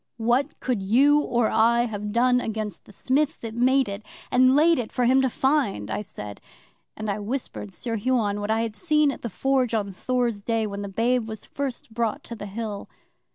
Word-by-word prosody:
'"What 240 +5 0
could 245 -6 -1
you 270 +9 +4
or 240 -5 +1
I 235 +2 +4
have 210 -3 -3
done 250 +2 +3
against 215 -5 -4
the - - -15
Smith 285 +8 0
that 225 -1 -5
made 255 +3 +3
it 200 +1 -6 0.3
and 255 +1 +5
laid 325 +1 +5
it 230 - -4
for 250 - 0
him 260 +2 +5
to 265 - +2
find?" 255 - 0
I - - -1
said, 105 - -8 0.6
and 215 - -4
I 200 0 -1
whispered 205 - -5
Sir 230 - -4
Huon 210 -3 0
what 205 +1 -4
I 220 +1 +2
had 225 -2 -3
seen 305 -2 +2
at - - -8
the 235 - -4
Forge 255 +1 +1
on 200 -3 -2
Thor's 240 0 -1
Day, 225 +1 0
when 200 -1 -5
the 200 - -5
babe 230 +3 0
was 220 -1 -7
first 265 -5 -5
brought 230 -2 -1
to 235 - -7
the 205 -2 -7
Hill. 210 0 -5
230 Hz, 205 wpm, -25 LUFS, 210-255 Hz, 0.6 s, and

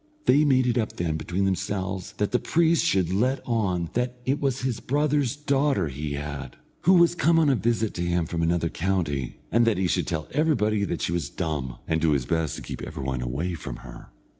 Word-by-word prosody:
They 145 +4 +5
made 130 -3 +4
it 120 -1 +2
up 110 - -2
then 85 -3 -2
between 90 +5 -1
themselves 95 0 -2
that 105 0 -1
the 125 - +2
priest 165 -1 +2
should 95 -2 +2
let 125 +7 +1
on 95 -8 0
that 125 +1 -1
it 135 +3 +1
was 135 -2 -1
his 125 -3 -1
brother's 145 -1 +1
daughter 140 - +1
he 70 +2 -4
had, 70 -2 -5 0.3
who 185 - +7
was 170 -1 +5
come 170 -1 +3
on 155 -3 +4
a - - +3
visit 115 -2 0
to 85 - -4
him 85 -1 +1
from 85 +1 -3
another 85 0 +1
county, 80 -9 -1
and 115 +1 +4
that 110 -5 +3
he 95 - +1
should 85 - 0
tell 80 -2 -3
everybody 110 -9 +2
that - - -3
she - - 0
was 85 -5 -1
dumb, 75 -8 -3
and 80 0 0
do 80 -2 +3
his 70 -3 0
best 80 +1 0
to - - -8
keep - - -6
every - - -6
one 65 -1 -2
away 70 +9 -2
from 80 - -6
her. - - -11
95 Hz, 220 wpm, -25 LUFS, 80-130 Hz, 0.3 s, who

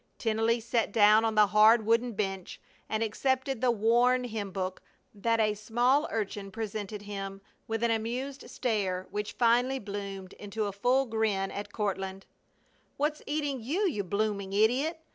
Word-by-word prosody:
Tennelly 225 +1 +1
sat 230 -1 0
down 215 +1 +6
on 225 -1 0
the 210 0 +7
hard 215 +2 +5
wooden 230 +2 +2
bench 195 -3 -4 0.3
and 220 +1 0
accepted 260 +3 -1
the 255 - +3
worn 240 +3 +3
hymn 215 -4 -4
book 185 -1 -4 0.3
that 230 +2 0
a 215 -1 +3
small 240 +7 +1
urchin 205 -2 -3
presented 210 0 -5
him, 195 -1 -6 0.3
with 225 +1 -2
an 235 - +3
amused 245 +5 -3
stare 195 -7 -1
which 210 0 -3
finally 245 +3 +3
bloomed 200 -4 -6
into 210 +1 -4
a 200 - -2
full 250 +7 +2
grin 220 -4 0
at 205 - -6
Courtland. 195 -2 -3 0.7
"What's 300 +1 -1
eating 290 -3 -2
you, 340 - 0
you 210 - -1
blooming 200 0 -2
idiot! 255 +11 +2
220 Hz, 155 wpm, -29 LUFS, 200-245 Hz, 0.7 s, the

